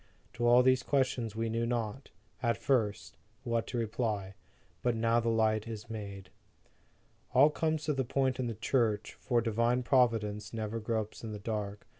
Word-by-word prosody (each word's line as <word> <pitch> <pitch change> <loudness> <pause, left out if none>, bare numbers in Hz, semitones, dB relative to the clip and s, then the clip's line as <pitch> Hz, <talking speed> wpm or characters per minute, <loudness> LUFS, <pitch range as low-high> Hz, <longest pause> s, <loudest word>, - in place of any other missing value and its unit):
To 120 +1 0
all 120 +1 +7
these 130 0 +4
questions 125 -5 0
we 115 +1 -1
knew 115 +1 -1
not, 120 +2 -3 0.3
at 115 -3 +1
first, 110 -6 0 0.3
what 115 -2 -1
to 120 - -4
reply. 110 -4 -2 0.5
But 120 -1 +1
now 115 +1 +2
the 115 0 0
light 110 -1 +2
is 115 0 -7
made. 100 -4 -7 1.0
All 140 +4 +7
comes 155 0 -1
to 150 0 0
the 135 -1 0
point 130 +1 0
in 125 - 0
the 115 - -3
Church, 110 -2 0
for 120 -3 +1
Divine 115 +2 +1
Providence 115 -5 +1
never 110 0 -3
gropes 110 0 -3
in 110 -1 -5
the - - -5
dark. 105 -1 -4
115 Hz, 170 wpm, -31 LUFS, 110-125 Hz, 1.0 s, all